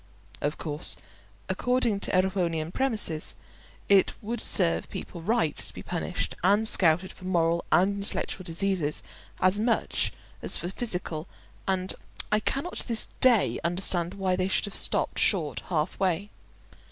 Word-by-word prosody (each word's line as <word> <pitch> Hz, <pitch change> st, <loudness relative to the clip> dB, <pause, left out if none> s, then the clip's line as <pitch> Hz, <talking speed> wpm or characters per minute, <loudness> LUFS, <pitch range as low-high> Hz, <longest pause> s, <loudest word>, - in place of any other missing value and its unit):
Of 145 Hz, +1 st, -1 dB
course, 150 Hz, 0 st, +1 dB, 0.5 s
according 245 Hz, -4 st, 0 dB
to -, -, -3 dB
Erewhonian 175 Hz, -4 st, 0 dB
premises, 215 Hz, -12 st, 0 dB, 0.5 s
it 195 Hz, -1 st, +4 dB
would 225 Hz, +2 st, -3 dB
serve 170 Hz, -4 st, +3 dB
people 170 Hz, -, -7 dB
right 215 Hz, -3 st, +1 dB
to -, -, -7 dB
be -, -, -8 dB
punished -, -, -3 dB
and 205 Hz, +4 st, +4 dB
scouted 180 Hz, -1 st, +5 dB
for 185 Hz, -, -13 dB
moral 170 Hz, -2 st, +1 dB
and 200 Hz, +3 st, +3 dB
intellectual 200 Hz, -1 st, -3 dB
diseases 170 Hz, -3 st, -1 dB, 0.4 s
as 185 Hz, +2 st, +3 dB
much 230 Hz, +1 st, +1 dB, 0.3 s
as -, -, +2 dB
for 175 Hz, -, -4 dB
physical, 180 Hz, -7 st, -2 dB, 0.4 s
and 190 Hz, -1 st, 0 dB, 0.4 s
I 210 Hz, -, +4 dB
cannot 275 Hz, +10 st, -3 dB
to -, -, -2 dB
this 230 Hz, -2 st, -1 dB
day 245 Hz, -5 st, +4 dB
understand 175 Hz, 0 st, 0 dB
why 190 Hz, -2 st, 0 dB
they 185 Hz, 0 st, 0 dB
should 190 Hz, -, +1 dB
have 205 Hz, -, -7 dB
stopped -, -, -1 dB
short 165 Hz, -8 st, +1 dB
half 160 Hz, -1 st, -1 dB
way. 190 Hz, +2 st, 0 dB
185 Hz, 145 wpm, -27 LUFS, 170-205 Hz, 0.5 s, scouted